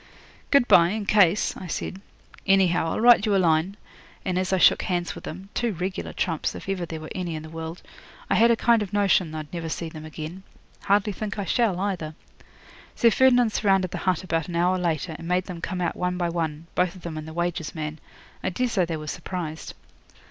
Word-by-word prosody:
'"Good 280 -4 +4
bye, 170 0 +6
in 210 +1 -3
case," 200 -2 +3
I 185 - -8
said. 185 +3 -4 0.5
"Anyhow, 180 -4 +3
I'll - - -2
write 235 -2 +7
you 205 - +3
a - - +5
line," 170 +2 +2 0.5
and 185 -1 0
as 185 0 -1
I 190 - +3
shook 180 - +5
hands 175 -2 -1
with - - -10
them 185 +4 -8
two 235 -3 0
regular 185 +2 -4
trumps, 165 -4 -2
if - - -9
ever 185 -3 -2
there 160 -1 -5
were 155 - -9
any 175 -3 -3
in 155 - -6
the 160 - -10
world 165 +1 -7 0.4
I - - +1
had 230 +1 +5
a 235 - +5
kind 230 0 +3
of 205 -2 -5
notion 190 -5 +2
I'd 155 0 -7
never 165 -2 -4
see 165 +1 -4
them 155 -1 -9
again. 155 +3 -7 0.4
Hardly 205 +1 +2
think 210 +2 -5
I 200 - -2
shall, 200 -1 +1
either. 180 -6 -3 0.8
Sir 230 - +4
Ferdinand 245 -1 +4
surrounded 195 -3 +2
the - - -4
hut 185 -2 0
about 165 -3 -1
an 175 - -5
hour 180 +2 +2
later, 165 -1 -1
and 165 - -8
made 180 +1 +1
them 175 -2 -8
come 180 +1 -3
out 170 - -1
one 180 0 -1
by 175 -1 0
one 165 -2 -3
both 180 -1 +1
of 185 - -13
them 170 -2 -5
and 155 0 -6
the - - -7
wages 175 -1 -2
man. 155 0 -4 0.4
I - - +1
daresay 200 -3 0
they 165 -1 -2
were 155 - -7
surprised. 160 0 -5
180 Hz, 220 wpm, -25 LUFS, 165-195 Hz, 0.8 s, write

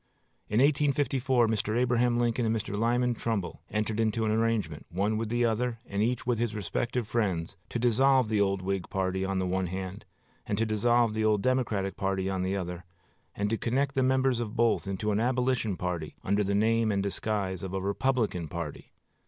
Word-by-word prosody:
In 105 - +2
1854 135 -3 +2
Mr. 110 0 0
Abraham 120 -1 +2
Lincoln 120 0 +1
and 115 0 +1
Mr. 105 -2 -3
Lyman 120 +3 +2
Trumbull 105 -8 -3
entered 110 +1 -1
into 110 0 +1
an 110 - +1
arrangement, 110 -9 0
one 100 +5 0
with 110 0 -2
the 120 +1 +2
other, 115 +1 0
and 100 +1 -2
each 120 +2 0
with 120 -2 0
his 115 -2 -1
respective 115 +3 -2
friends, 95 -8 -1
to - - -2
dissolve 130 +2 +4
the 105 -1 +1
old 100 -1 +1
Whig 95 -1 -2
party 95 0 -1
on 95 0 -1
the 95 - 0
one 95 0 0
hand, 95 +1 -6 0.4
and 105 - -1
to 115 - +2
dissolve 115 +1 +2
the 110 0 -1
old 105 -2 +2
Democratic 115 -7 0
party 95 0 -1
on 95 -1 -1
the 95 +2 -1
other, 90 -1 -5 0.5
and 105 +1 -1
to 115 - 0
connect 135 +4 0
the 135 - +1
members 130 -1 +2
of 115 -1 -4
both 115 -3 +2
into 100 +2 -1
an 105 - +1
Abolition 125 -4 +1
party, 85 -4 -3
under 100 +2 +1
the 100 0 0
name 110 +1 +2
and 100 -1 0
disguise 100 -2 -2
of 95 0 -5
a - - 0
Republican 100 -3 0
party. 85 -1 -6
110 Hz, 195 wpm, -29 LUFS, 95-120 Hz, 0.5 s, dissolve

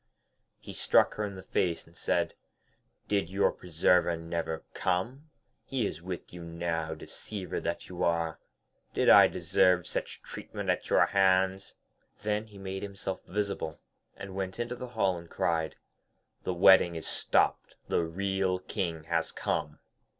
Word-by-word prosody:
He - - -10
struck - - +4
her 105 - -3
in 100 -1 -6
the 95 - -9
face, 85 -3 0
and 85 - -21
said, - - 0 0.7
'Did 100 -5 +1
your 100 +2 +2
preserver 85 0 +2
never 80 -1 -3
come? 120 - -1 0.3
He 130 -5 -1
is 80 - -4
with 90 -1 -6
you 90 -1 -8
now, 85 -1 -2
deceiver 95 +4 -5
that 85 - -3
you 90 0 -4
are. 85 -1 +1 0.6
Did - - +3
I - - +10
deserve 90 -2 +3
such - - -4
treatment - - -3
at - - -3
your - - +5
hands?' 95 0 +2 0.5
Then 105 +1 0
he 105 -2 -14
made 95 0 -5
himself 100 -1 -5
visible, 100 -5 -2 0.4
and 95 -1 -7
went 95 +2 -4
into 120 +1 -2
the 125 +1 -6
hall, 100 -7 0
and 85 0 -13
cried, 80 -1 0 0.7
'The 90 - 0
wedding 90 -1 +7
is 80 - -5
stopped, - - +1
the - - +2
real 95 +2 0
King 90 -4 -3
has 85 0 -1
come.' - - -2
95 Hz, 150 wpm, -30 LUFS, 85-100 Hz, 0.7 s, I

